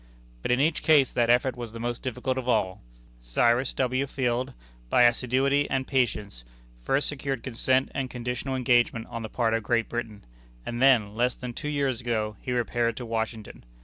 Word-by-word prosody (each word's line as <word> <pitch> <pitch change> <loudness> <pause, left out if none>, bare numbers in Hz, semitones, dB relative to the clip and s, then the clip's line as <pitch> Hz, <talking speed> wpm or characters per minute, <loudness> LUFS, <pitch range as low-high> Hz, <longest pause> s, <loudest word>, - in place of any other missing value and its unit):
But - - -3
in 125 +1 +3
each 155 +3 +2
case 145 -5 +4
that 120 -1 +1
effort 125 +2 +3
was 120 -3 -7
the 115 - -7
most 120 +1 -3
difficult 130 +1 -2
of 130 -1 -3
all. 95 -6 +1 0.4
Cyrus 120 - +2
W. 130 +1 0
Field, 125 - -1 0.3
by 125 - +5
assiduity 130 +4 +2
and 130 -1 0
patience, 110 - -1 0.4
first 135 - +1
secured 135 -4 -3
consent 130 +2 +1
and 135 -2 -2
conditional 125 +2 -4
engagement 120 -3 +2
on 115 - -4
the 110 - -5
part 115 -1 0
of 115 - +1
Great 115 +1 0
Britain, 115 - -5 0.4
and 120 +1 -4
then, 120 -7 +4
less 120 +3 0
than 125 -1 -7
two 150 +5 -5
years 140 -5 -1
ago, 110 -3 -2
he 125 - -4
repaired 120 -1 0
to 125 - -5
Washington. 110 -1 -4
120 Hz, 180 wpm, -27 LUFS, 115-130 Hz, 0.4 s, by